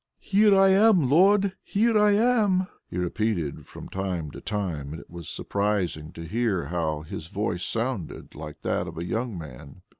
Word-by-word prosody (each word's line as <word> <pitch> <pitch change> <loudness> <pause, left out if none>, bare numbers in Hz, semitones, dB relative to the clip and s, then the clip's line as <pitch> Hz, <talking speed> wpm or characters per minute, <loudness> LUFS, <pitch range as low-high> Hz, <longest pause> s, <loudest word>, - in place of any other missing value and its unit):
"Here 205 0 +4
I 195 0 +6
am, 190 - +5
Lord, 195 +4 +4
here 225 +3 +1
I 210 -1 +5
am!" 210 -4 +3 0.2
he - - -6
repeated 90 -3 -2
from - - -10
time 90 -6 -3
to - - -10
time, 85 -9 -3
and 80 - -7
it - - -15
was 85 -2 -8
surprising 100 -7 -2
to 85 - -8
hear 100 -1 -1
how 80 -3 -2
his 80 +1 -7
voice 90 -2 -2
sounded 115 -6 -3
like 75 0 -9
that - - -1
of 80 0 -8
a 85 - -3
young 110 +2 -2
man. 75 +2 -10
100 Hz, 175 wpm, -26 LUFS, -, 0.2 s, I